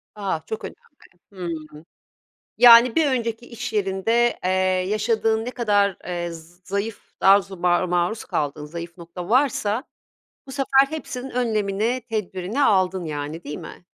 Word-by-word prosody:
A! 195 -6 -2
Çok 220 - -5
önemli. - - -12 0.4
Hımm. 170 -4 -5 0.9
Yani, 235 0 +8
bir 320 - +4
önceki 235 -3 -2
iş 245 -1 -6
yerinde, 215 +4 +1
eee, 185 - +1 0.4
yaşadığın 220 +1 +1
ne 250 - -4
kadar, 205 -6 +1
eee, 175 -1 -3 0.4
zayıf 200 +2 -4
dazu 195 0 +4
maru 175 +1 +2
maruz 180 +5 -1
kaldığın 150 0 -2
zayıf 170 +2 -8
nokta 175 +1 -8
varsa 245 -3 +2 0.6
bu - - -8
sefer 270 0 +3
hepsinin 270 -4 -6
önlemini, 225 -1 0
tedbirini 210 +3 -2
aldın, 185 -5 +2
yani, 150 +2 -5
değil 150 +1 -6
mi? 175 +1 -11
205 Hz, 135 wpm, -23 LUFS, 180-235 Hz, 0.9 s, Yani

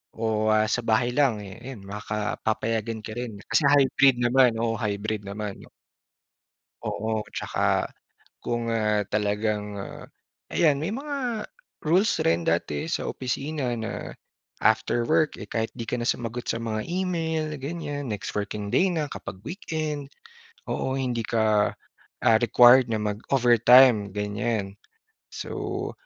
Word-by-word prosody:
o, 110 -1 0
ah, 110 0 +3
sa - - +1
bahay 115 +2 +3
lang, 125 -6 +2
eh, 100 +3 -10
'yan 125 -4 -9
makaka 105 +1 -4
papayagan 110 0 -1
ka 110 - -7
rin. 110 -3 -6
Kasi 145 - +2
hybrid 140 -1 +5
naman, 125 -1 +4
oo, 115 -1 -1
hybrid 105 0 -2
naman. 105 0 -5 1.2
Oo, 110 +1 -2
tsaka - - 0 0.6
kung, 120 -1 -2
ah, 105 -2 +1
talagang, 105 0 -1
ah, 100 - -8 0.5
ayan 150 -4 +4
may 160 +8 -2
mga 260 -5 -3 0.3
rules 185 +8 +2
rin 85 +1 +1
dati 75 -3 0
sa - - -2
opisina 135 0 -2
na 115 -1 -5 0.5
after 110 +2 +2
work, 160 -1 +3
eh, 105 - -9
kahit 115 -1 -2
'di 115 -2 -5
ka 125 - -1
na 120 - -2
sumagot 120 -1 -2
sa 115 - -1
mga 110 -2 -3
email 165 -3 -1
ganyan, 145 0 -5
next 105 - -5
working 105 0 -3
day 185 - +3
na 155 -3 -1
kapag 95 -8 -8
weekend. 155 - -4 0.6
Oo, 130 0 -1
hindi 125 -3 -1
ka, 110 -2 +2 0.5
ah, 115 - +6
required 120 0 +6
na 110 - 0
mag-overtime, 120 0 +5
ganyan. 105 0 -2 0.6
So, - - -4
115 Hz, 135 wpm, -26 LUFS, 105-135 Hz, 1.2 s, ah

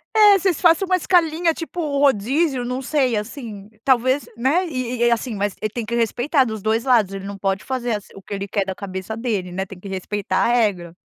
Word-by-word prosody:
É, 415 -2 +7
vocês 365 -3 +1
façam 345 +2 +4
uma 370 - +3
escalinha, 335 -2 +2
tipo 330 +2 -7
um 285 -3 -1
rodízio. 270 +2 +2
Não 250 +2 -3
sei, 265 -3 +1
assim, 210 -2 -6
talvez, 260 +2 +2
né. 275 +10 +1
E 255 -5 -3
e - - +5
e 235 - +4
assim, 235 -1 -1
mas 200 -1 -2
ele 215 - -1
tem 235 -2 -4
que 235 - -3
respeitar 245 +5 +2
dos 220 -3 -5
2 220 +3 0
lados. 230 -7 +3
Ele 195 0 -6
não 200 0 -6
pode 195 0 -1
fazer 255 -2 -2
assim 205 - -9
o 195 - -11
que 200 - -8
ele 200 0 -4
quer 200 -1 -1
da 190 - -3
cabeça 190 +2 -6
dele, 215 -6 -2
né. 190 +2 -3
Tem 195 -1 -11
que 200 - -10
respeitar 195 +1 -3
a - - +3
regra. 200 -8 +1
235 Hz, 235 wpm, -21 LUFS, 200-280 Hz, -, É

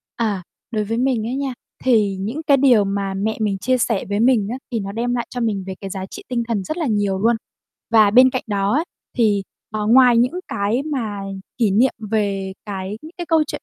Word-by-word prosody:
À. 210 -5 -1 0.3
Đối 215 -2 0
với 225 +2 -2
mình 245 -3 +1
ấy 250 - -2
nha, 275 -2 -2 0.3
thì 210 -6 +3
những 225 +11 -3
cái 280 -2 +6
điều 255 -6 +5
mà 195 0 -2
mẹ 205 +3 -1
mình 205 -2 0
chia 255 +6 +1
sẻ 230 -4 0
với 205 - 0
mình 230 -3 +3
á 250 - -3
thì 230 - 0
nó 195 -1 -4
đem 235 +3 -1
lại 240 - -2
cho 245 - -4
mình 210 -4 -1
về 190 - -4
cái 195 - -5
giá 190 0 -4
trị - - -10
tinh 240 -2 0
thần 220 -5 -1
rất 310 - -4
là 335 - -1
nhiều 205 -3 0
luôn. 230 +4 +3 0.6
Và 215 -3 +6
bên 255 +4 +7
cạnh 255 - -2
đó 200 -2 0
á 305 +6 +2 0.3
thì, 210 -4 +3 0.3
ờ, 215 -1 -2
ngoài 245 +1 +6
những 245 +2 +3 0.2
cái 205 +6 0
mà 235 -9 -3 0.4
kỷ 225 -5 +3
niệm 240 +7 +4 0.2
về 200 -3 0
cái 195 +1 -5 0.2
cái 345 - -4
câu 325 -2 +3
chuyện - - -6
220 Hz, 230 wpm, -21 LUFS, 200-250 Hz, 0.6 s, bên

